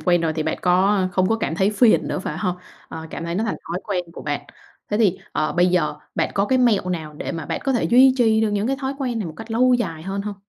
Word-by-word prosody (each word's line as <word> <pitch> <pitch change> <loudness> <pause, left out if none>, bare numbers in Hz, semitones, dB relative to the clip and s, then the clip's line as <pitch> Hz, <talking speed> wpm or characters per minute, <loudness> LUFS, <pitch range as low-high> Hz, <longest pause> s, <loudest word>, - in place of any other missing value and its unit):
quen 175 -1 +2
rồi 165 -1 0
thì 155 0 -2
bạn 160 - -2
có 190 +3 +3
không 185 +1 +2
có 225 - +2
cảm 215 -7 -2
thấy 190 +4 +2
phiền 215 +2 +3
nữa, - - -2
phải 190 - -5
hông? 180 -3 -1 0.3
Ờ, 160 0 -7
cảm 165 - -6
thấy 170 - -3
nó 215 +5 0
thành 225 - -2
thói 175 +3 -3
quen 185 -4 -2
của - - -9
bạn. 145 -1 -2 0.5
Thế 210 - +1
thì, 205 -6 +2
ờ, 155 - 0
bây 175 0 +3
giờ 180 -1 +1 0.2
bạn - - 0
có 200 - +2
cái 260 +3 +1
mẹo 215 -7 +2
nào 160 -4 -4
để - - -5
mà 160 -3 -5
bạn - - -3
có 270 - +1
thể 240 - 0
duy 255 +2 +6
trì 220 -3 +3
được 220 -1 +1
những 205 +1 0
cái 270 - 0
thói 270 +1 -2
quen 250 -4 -2
này 210 - -3
một 160 - -8
cách 225 +4 -10
lâu 250 +3 +4
dài 165 -10 -2
hơn 195 +2 -3
hông? 210 0 -5
200 Hz, 290 wpm, -22 LUFS, 175-225 Hz, 0.5 s, duy